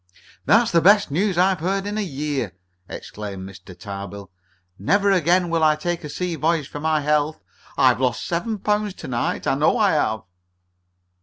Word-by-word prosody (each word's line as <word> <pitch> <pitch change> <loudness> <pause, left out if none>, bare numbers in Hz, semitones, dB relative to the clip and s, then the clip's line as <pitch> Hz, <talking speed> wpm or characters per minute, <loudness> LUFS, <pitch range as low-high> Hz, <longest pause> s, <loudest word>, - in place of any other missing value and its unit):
"That's 225 +2 +4
the 170 - +4
best 205 -2 +5
news 185 +4 0
I've 185 0 +3
heard 195 +4 -1
in 205 +1 -3
a 215 - -1
year!" 145 - -3 0.4
exclaimed 100 -3 -7
Mr. 95 -1 -13
Tarbill. 100 -1 -8 0.5
"Never 200 - +2
again 180 -1 +2
will 165 -1 +1
I 155 -1 +5
take 170 +2 -3
a 150 - -6
sea 180 +3 -3
voyage 160 -2 0
for 145 - -8
my 155 0 +1
health. 150 +1 0 0.4
I've 120 - +4
lost 125 -2 0
seven 215 +6 -2
pounds 210 0 -1
to 160 - -9
night, 120 -2 -2
I - - +2
know - - +2
I - - +3
have." 110 0 0
160 Hz, 175 wpm, -22 LUFS, 130-190 Hz, 0.5 s, best